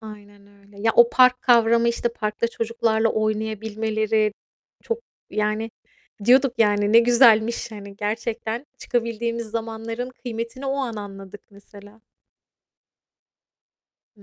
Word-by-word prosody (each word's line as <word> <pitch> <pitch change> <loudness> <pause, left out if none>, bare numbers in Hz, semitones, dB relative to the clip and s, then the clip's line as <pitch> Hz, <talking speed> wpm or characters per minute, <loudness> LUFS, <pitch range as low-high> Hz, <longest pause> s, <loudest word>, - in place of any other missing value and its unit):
Aynen 205 -2 -13
öyle. 200 0 -22
Ya, 225 0 +2
o 235 0 +7
park 255 0 +4
kavramı, 235 -1 +4
işte, 235 0 -1
parkta 215 +1 -2
çocuklarla 230 -1 0
oynayabilmeleri 215 0 -1 0.5
çok, 460 -1 -3 0.3
yani, 215 +1 -1 0.5
diyorduk, 255 +1 +4
yani, 205 -1 +2
ne 230 - +8
güzelmiş. 235 -1 +4
Hani, 200 -1 -10
gerçekten 225 +3 -4
çıkabildiğimiz 235 0 -2
zamanların 230 +2 -5
kıymetini 240 +2 -6
o 270 +1 -1
an 255 -5 -3
anladık 195 -1 -9
mesela. 205 +2 -16 2.1
Hı 200 - -20
225 Hz, 110 wpm, -23 LUFS, 210-235 Hz, 2.1 s, ne